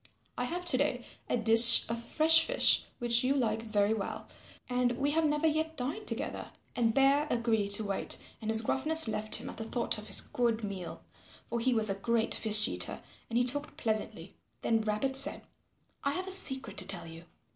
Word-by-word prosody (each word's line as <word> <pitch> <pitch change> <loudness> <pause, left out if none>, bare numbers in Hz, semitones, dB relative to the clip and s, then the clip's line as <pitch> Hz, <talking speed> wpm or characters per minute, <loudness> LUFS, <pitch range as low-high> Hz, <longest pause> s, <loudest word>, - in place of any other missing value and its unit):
I 245 - -5
have 355 +7 -7
to 260 - +2
day 260 -4 -3 0.2
a - - -2
dish 230 +1 +8
of 230 +1 -7
fresh 320 +6 +5
fish - - +5
which 240 0 +2
you 265 +2 -1
like 225 -5 -3
very 215 -1 -2
well, 210 -3 -8 0.4
and 250 -1 -2
we 280 +4 -3
have 320 +1 -1
never 300 +1 -2
yet 315 +1 -3
dined 290 +12 -7
together." - - -7 0.3
And 230 -2 -1
Bear 275 +4 0
agreed 230 -4 -2
to 215 - +2
wait 200 -2 -3 0.2
and 220 - -7
his 220 0 +4
gruffness 310 +5 +4
left 215 0 -4
him - - -7
at - - -11
the 225 - -7
thought 235 0 -2
of 210 - -13
his 195 - +6
good 230 -2 -4
meal, 190 - -9 0.4
for 235 - -6
he 250 +1 -2
was 215 -2 +1
a - - -2
great 225 +3 -2
fish 215 0 +5
eater, - - -4 0.3
and 230 - -4
he 245 - 0
talked 290 +4 -2
pleasantly. 215 -1 -6 0.3
Then 225 -1 -1
Rabbit 215 +5 -4
said, 275 +2 -1 0.6
"I 280 - -3
have 370 +4 -6
a 380 - -6
secret 265 - -1
to - - -5
tell 190 - -7
you. 165 +1 -14
235 Hz, 200 wpm, -28 LUFS, 220-280 Hz, 0.6 s, dish